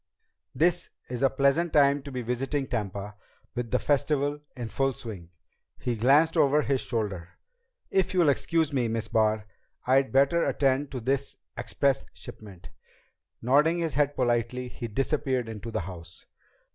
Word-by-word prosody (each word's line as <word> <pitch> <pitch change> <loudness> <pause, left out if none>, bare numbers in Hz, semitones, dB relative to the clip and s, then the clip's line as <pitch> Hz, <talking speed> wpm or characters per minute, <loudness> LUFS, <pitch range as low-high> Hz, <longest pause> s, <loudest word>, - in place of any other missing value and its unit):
This 175 +2 +1 0.2
is 125 - -3
a 135 - +4
pleasant 140 +6 +1
time 140 -1 +4
to 140 +1 -9
be 125 -1 -4
visiting 135 +4 -2
Tampa, 100 -2 -4 0.4
with 120 -1 -3
the 125 - +2
Festival 145 +1 0 0.2
in 120 -2 -4
full 135 +5 0
swing." 100 -9 -7 0.5
He 120 - -2
glanced 140 +8 +4
over 145 +2 +4
his 135 -2 0
shoulder. 100 -8 -4 0.5
"If 190 -1 +2
you'll 170 -5 +4
excuse 160 +2 +1
me, 125 -4 +1
Miss 115 0 -2
Barr, 110 -1 +1 0.4
I'd 135 +1 +3
better 140 +6 +3
attend 135 0 +1
to 130 - -4
this 135 +3 -1 0.2
express 140 -3 0
shipment." 100 -5 -11 0.7
Nodding 150 +7 +4
his 165 -3 -1
head 145 0 +1
politely, 125 0 0
he 120 -1 -6
disappeared 130 +1 -1
into 110 0 -7
the 110 - -2
house. 85 -1 -10
130 Hz, 150 wpm, -27 LUFS, 115-145 Hz, 0.7 s, a